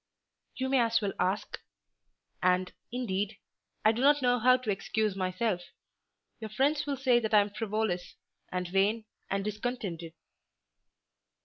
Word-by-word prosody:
"You 260 - -2
may 265 0 +3 0.2
well 200 -2 -2
ask. 190 +3 -1 0.8
And, 185 0 +2 0.2
indeed, 210 -4 -2 0.5
I 215 - +7
do 230 +2 -3
not 290 0 +4
know 245 0 +3
how 255 +3 +5
to 250 -4 -2
excuse 210 +1 -1
myself. 185 +1 -1 0.8
Your 220 - -6
friends 285 +7 +1
will 280 -1 -1
say 255 -2 +4
that 220 -2 0
I 210 - +8
am 205 0 -3
frivolous, 215 -4 -2 0.4
and 180 0 -2
vain, 200 +5 +1 0.2
and 195 0 -1
discontented." 210 -7 -4
215 Hz, 135 wpm, -30 LUFS, 195-245 Hz, 0.8 s, I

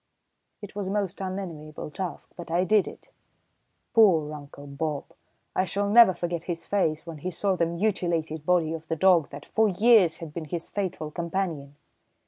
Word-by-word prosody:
It 200 - -9
was 205 -2 -3
a - - -2
most 200 -2 -2
unenviable 170 -6 -6
task, 185 +2 -6
but 175 - -9
I 175 +2 +2
did 205 +2 +3
it. - - -11 0.8
Poor 165 -9 +5
Uncle 145 -1 -10
Bob! 145 +1 -3 0.5
I 185 - +2
shall 200 +3 -1
never 220 -5 +8
forget 170 -1 -3
his 170 -1 -4
face 160 -6 0
when 165 -3 -8
he 180 - -3
saw 190 +2 0
the 170 -2 +1
mutilated 170 -4 -1
body 165 -1 +2
of 160 -1 -7
the 160 - -1
dog 170 -3 +4
that 140 0 -9
for 220 -1 +2
years 200 -3 +5
had 160 -3 -9
been 165 -1 -5
his 170 +2 -5
faithful 180 -6 -3
companion. 170 -4 -3
170 Hz, 175 wpm, -26 LUFS, 155-190 Hz, 0.8 s, never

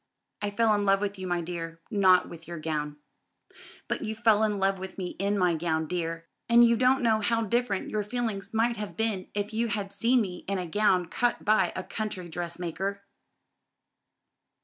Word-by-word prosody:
"I 205 - 0
fell 220 +1 +2
in 205 -1 +1
love 195 -1 +4
with 200 -1 -3
you, 185 - -4
my 175 -1 0
dear, 165 -1 -5
not 190 -3 +5
with 165 -1 -11
your 170 0 -6
gown." 150 -2 -3 0.9
"But - - -2
you 220 - -3
fell 220 -1 +4
in 210 -2 +1
love 195 0 +1
with 190 0 -7
me 185 -2 -3
in 200 +1 +1
my 180 -3 +3
gown, 160 -1 -1
dear; 165 0 -3 0.2
and 235 0 +7
you 235 0 +4
don't 255 +2 +3
know 220 -2 +3
how 230 +2 +1
different 220 -2 -1
your 215 - 0
feelings 210 -2 -3
might 230 +1 +1
have 210 -1 -6
been 220 -4 -1
if 205 +1 -2
you 230 +2 0
had 205 -3 -3
seen 245 +2 +3
me 180 -4 -5
in 195 0 -1
a 180 - -3
gown 185 0 +2
cut 240 +8 -1
by 210 -4 +3
a 185 - -3
country 200 -5 -4
dressmaker." 175 +4 -4
200 Hz, 195 wpm, -28 LUFS, 175-220 Hz, 0.9 s, and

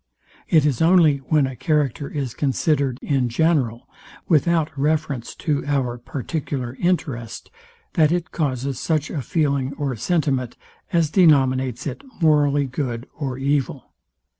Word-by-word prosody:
It 155 -3 +4
is 145 -3 0
only 165 -4 +5
when 140 +1 +1
a 130 -1 -5
character 140 +1 0
is 140 -6 -4
considered 140 -2 0
in 130 -4 +1
general, 125 -4 +1 0.4
without 160 -1 +2
reference 145 -3 -1
to 150 -3 -1
our 130 -4 -1
particular 130 -1 -4
interest, 135 -10 -2 0.4
that 155 -3 +3
it 175 -4 -1
causes 135 -4 -2
such 155 -2 -1
a 150 - -3
feeling 140 -2 0
or 140 -4 -2
sentiment, 135 - -1 0.3
as 165 -4 +2
denominates 130 - +3
it 275 - -5 0.2
morally 145 -3 +3
good 125 -2 -4
or 135 -4 -4
evil. 140 0 -2
140 Hz, 130 wpm, -22 LUFS, 130-155 Hz, 0.4 s, only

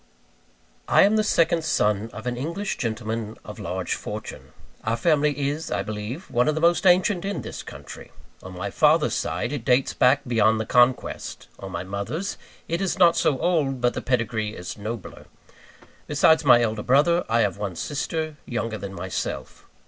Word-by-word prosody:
I - - +6
am 205 +2 +4
the 215 - +3
second 170 -4 +2
son 105 -8 +1
of 110 +3 -9
an 125 0 -2
English 170 +10 -3
gentleman 110 -2 -3
of - - -9
large - - -3
fortune. - - -7 0.3
Our 115 +1 0
family 145 0 +2
is, 155 +3 -4
I - - -1
believe, 110 - -6
one 125 +1 +2
of 155 - +2
the - - -1
most 170 +3 +3
ancient 180 0 +4
in 200 +1 -3
this - - -7
country. - - -11 0.3
On 95 -1 -10
my 100 +2 -4
father's 155 +4 +3
side, 125 - -2
it 140 -6 -4
dates 125 +2 +2
back 135 +3 +4
beyond 110 -2 +3
the 110 - -2
Conquest; 125 +2 +1
on 95 - -7
my 85 0 -4
mother's, 100 - -4 0.3
it 170 +3 -2
is 195 -1 -1
not 175 -3 +6
so 140 - +2
old, 145 -5 0
but 120 0 +1
the - - -4
pedigree 110 -4 -1
is 90 - -7
nobler. 110 0 -7 0.8
Besides 160 -1 +4
my 120 -4 +6
elder 110 -2 -1
brother, 150 +9 +3
I 115 +1 +3
have 100 -2 0
one 100 -4 -3
sister, 155 - -3
younger 115 -2 -3
than 95 0 -7
myself. 85 - -5
125 Hz, 180 wpm, -24 LUFS, 110-160 Hz, 0.8 s, I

